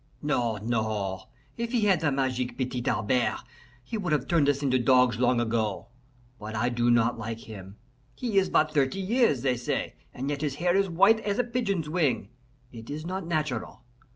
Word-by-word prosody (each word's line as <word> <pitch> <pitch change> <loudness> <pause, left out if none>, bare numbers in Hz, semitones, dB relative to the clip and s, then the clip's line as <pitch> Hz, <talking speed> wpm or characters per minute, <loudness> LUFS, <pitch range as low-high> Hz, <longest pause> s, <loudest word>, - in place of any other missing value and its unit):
"No, 120 -7 0
no! 105 -4 -2 0.3
If 235 0 -3
he 240 - +2
had 195 -5 +3
the 155 -2 +1
magic 130 -2 -1
Petit 125 -2 -3
Albert, 120 +3 0 0.4
he 215 - -5
would 180 -5 -2
have 135 -3 0
turned 160 -5 +3
us 145 0 0
into 130 -2 +2
dogs 125 -2 +4
long 125 -1 +3
ago. 110 -2 -1 0.5
But 110 +1 -7
I 120 +3 +1
do 120 0 +1
not 120 0 +3
like 115 0 -5
him. 100 -2 -10 0.4
He 225 -6 +1
is 190 -1 0
but 155 0 +2
thirty 140 +4 +1
years, 195 - +2
they 130 -2 +1
say, 120 - -2 0.2
and 135 +3 -4
yet 145 -1 -3
his 145 -3 -1
hair 175 +4 +1
is 195 -1 +2
white 195 +6 +5
as 205 -1 -2
a 245 - +2
pigeon's 220 -9 -2
wing. 145 - 0 0.4
It 115 -2 -11
is 155 +2 -5
not 185 0 -4
natural. 150 -7 -3
130 Hz, 190 wpm, -27 LUFS, 120-175 Hz, 0.5 s, white